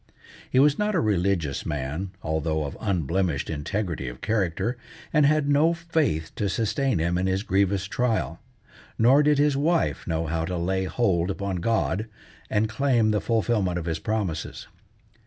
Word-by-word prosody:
He - - 0
was 145 +2 +5
not 210 0 +1
a - - +3
religious 95 - 0
man, 75 +7 -3
although 80 0 -1
of 70 - -6
unblemished 90 -5 -1
integrity 80 -1 -3
of - - -7
character, 105 +2 -1 0.4
and 150 -3 +5
had 155 -1 +2
no 150 +4 +3
faith 155 - -1
to 100 - 0
sustain 120 +3 0
him 85 +2 0
in 95 - 0
his 95 +1 0
grievous 95 -1 +1
trial; 100 - -1 0.6
nor 130 +6 +5
did 150 0 +3
his 145 0 +3
wife 160 +4 0
know 80 -1 -1
how 80 +1 -1
to 90 +1 -3
lay 95 +2 0
hold 95 -5 +1
upon 100 -1 -2
God, 110 +1 0 0.4
and 110 +1 +1
claim 115 -1 +2
the 105 - +1
fulfilment 110 -6 0
of 85 - -4
his 80 -1 -2
promises. 100 -8 -3
100 Hz, 160 wpm, -25 LUFS, 85-125 Hz, 0.6 s, was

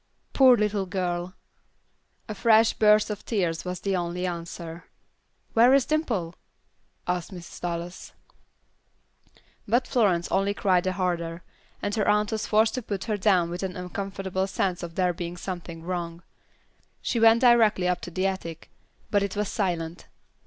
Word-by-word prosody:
"Poor 260 -3 +7
little 210 -2 0
girl!" 180 -1 -3 0.9
A 215 - -4
fresh 220 +2 +4
burst 210 0 +4
of 210 0 -6
tears 175 -7 -1
was 180 0 -5
the 195 0 0
only 175 0 -2
answer. 170 -1 -6 0.7
"Where 240 +4 +6
is 275 -2 +3
Dimple?" 230 - -1 0.7
asked 180 0 -2
Mrs. 175 -3 -10
Dallas. 175 0 -5 1.6
But 240 +4 +2
Florence 190 -8 +2
only 200 +1 +1
cried 185 -3 +2
the 185 - 0
harder, 170 -2 -2 0.4
and 205 - -1
her 210 -2 0
aunt 210 +1 +2
was 220 -1 -2
forced 220 +1 +3
to 255 - -2
put 200 -4 -4
her 215 - -1
down 185 -4 +2
with 175 - -4
an 190 -2 -4
uncomfortable 190 +1 -3
sense 190 -2 -1
of 170 -2 -7
there 180 -1 +1
being 175 0 -6
something 175 -2 -6
wrong. 170 -1 -4 0.8
She 235 - 0
went 225 +1 +6
directly 225 -7 +5
up 180 0 0
to - - -6
the 185 +2 -2
attic, 170 -4 -4 0.4
but 205 - +3
it 200 0 -2
was 210 0 -1
silent. 170 -4 -3
185 Hz, 155 wpm, -26 LUFS, 175-210 Hz, 1.6 s, Poor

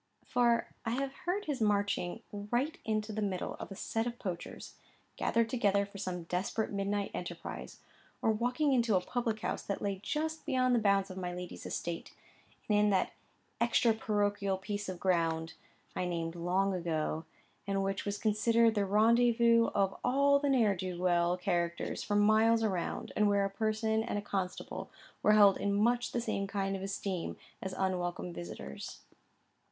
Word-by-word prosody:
For 240 -1 +3 0.2
I 230 -1 -1
have 270 +1 -2
heard 370 +5 -2
of - - -14
his 280 -5 -2
marching 205 -1 0
right 240 +9 -1
into 215 0 -1
the 215 - -2
middle 190 -3 -2
of - - -6
a - - -6
set 225 +4 -2
of 240 0 -4
poachers, 180 -6 -6 0.4
gathered 230 -1 +1
together 205 -4 +2
for 200 0 -11
some 180 -3 -3
desperate 185 +6 -2
midnight 200 0 -1
enterprise, 175 -1 -6 0.4
or 225 - +2
walking 250 +6 +1
into 235 -4 +3
a - - +5
public 230 0 -2
house - - -2
that 200 - -3
lay 200 -2 -2
just 315 +8 -2
beyond 255 -3 +2
the 240 - +4
bounds 200 -2 +2
of 185 - -8
my 180 -1 -3
lady's 180 0 -7
estate, 170 -1 -4 0.5
and 210 -1 +3
in 210 0 +4
that 190 -2 +1 0.5
extra 235 0 +4
parochial 205 -3 0
piece 205 +1 -4
of 180 -2 -5
ground 165 -3 +1 0.4
I 180 - -1
named 165 -2 -2
long 180 +3 +1
ago, 160 -2 -2 0.4
and 195 0 0
which 195 0 -1
was 205 0 -2
considered 225 +2 +3
the 205 -2 +1
rendezvous 230 +2 +5
of 195 -1 +2
all 280 +3 +4
the 285 0 0
ne'er 225 -7 +4
do 180 -1 -4
weel 175 -1 +2
characters 175 -2 -1
for 205 - -1
miles 220 +2 +4
round, 185 -5 -2
and 210 -1 +4
where 200 -1 +3
a 195 - -2
parson 220 +1 0
and 225 -2 -2
a - - -1
constable 190 -3 -4 0.3
were 210 - +5
held 205 -2 +7
in 200 0 0
much 240 +3 +2
the 240 - -1
same 195 -4 -2
kind 195 0 -1
of 190 - -5
esteem 195 -2 -3 0.2
as 190 - -4
unwelcome 175 - -1
visitors. 85 -5 -7
205 Hz, 175 wpm, -32 LUFS, 185-230 Hz, 0.5 s, held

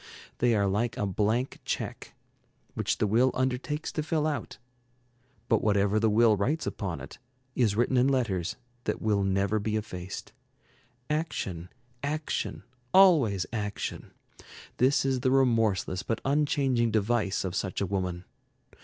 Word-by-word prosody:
They 120 -1 +3
are 100 -1 +2
like 110 +4 0
a 105 - 0
blank 110 +6 0
check, - - -4 0.6
which - - -1
the - - +1
will 115 +5 +3
undertakes 130 +4 -1
to 155 - -2
fill 155 0 0
out. 145 -7 -3 0.9
But 115 - +3
whatever 100 0 +2
the 110 0 +3
will 110 0 +5
writes 135 +11 -1
upon 90 -6 -3
it, - - -10 0.4
is 110 -5 +2
written 120 +3 +2
in 125 +2 +4
letters 115 -11 0 0.3
that - - -1
will 105 -2 +1
never 100 +2 +1
be 105 +1 -2
effaced. 100 -1 -5 0.7
Action, 100 - -3 0.3
action, 150 +2 -3 0.3
always 145 - +5
action, 105 -2 -4 0.7
this 135 +2 +3
is 135 -1 +1
the 130 +1 +1
remorseless 115 -8 +2
but 115 +3 -2
unchanging 135 -4 +2
device 105 -2 0
of 90 - -3
such 95 0 -2
a 100 - 0
woman. 90 -2 -3
110 Hz, 140 wpm, -28 LUFS, 100-130 Hz, 0.9 s, will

